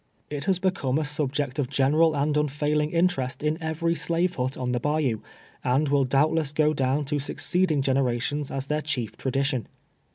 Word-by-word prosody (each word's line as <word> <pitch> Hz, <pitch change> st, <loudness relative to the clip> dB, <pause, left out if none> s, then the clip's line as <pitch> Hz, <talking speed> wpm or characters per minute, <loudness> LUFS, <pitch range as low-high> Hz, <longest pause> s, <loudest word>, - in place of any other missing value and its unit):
It 145 Hz, -1 st, -4 dB
has 190 Hz, -2 st, +2 dB
become 180 Hz, -8 st, 0 dB
a 155 Hz, -, 0 dB
subject 145 Hz, -2 st, -2 dB
of 130 Hz, -3 st, 0 dB
general 150 Hz, +4 st, +3 dB
and 145 Hz, +1 st, +1 dB
unfailing 150 Hz, +1 st, +1 dB
interest 160 Hz, -7 st, 0 dB
in 155 Hz, +2 st, 0 dB
every 160 Hz, +1 st, 0 dB
slave 170 Hz, +1 st, 0 dB
hut 130 Hz, -3 st, -2 dB
on 125 Hz, -1 st, -2 dB
the 125 Hz, -, 0 dB
bayou, 145 Hz, -5 st, 0 dB, 0.4 s
and 135 Hz, +4 st, +2 dB
will 140 Hz, -1 st, +3 dB
doubtless 145 Hz, +3 st, +2 dB
go 150 Hz, 0 st, +2 dB
down 140 Hz, +1 st, 0 dB
to 145 Hz, +1 st, -1 dB
succeeding 155 Hz, +1 st, 0 dB
generations 135 Hz, +2 st, 0 dB
as 135 Hz, -1 st, -3 dB
their 150 Hz, +2 st, -1 dB
chief 130 Hz, -7 st, -3 dB
tradi 135 Hz, +1 st, -1 dB
tion. 130 Hz, -6 st, -1 dB
145 Hz, 175 wpm, -26 LUFS, 135-155 Hz, 0.4 s, general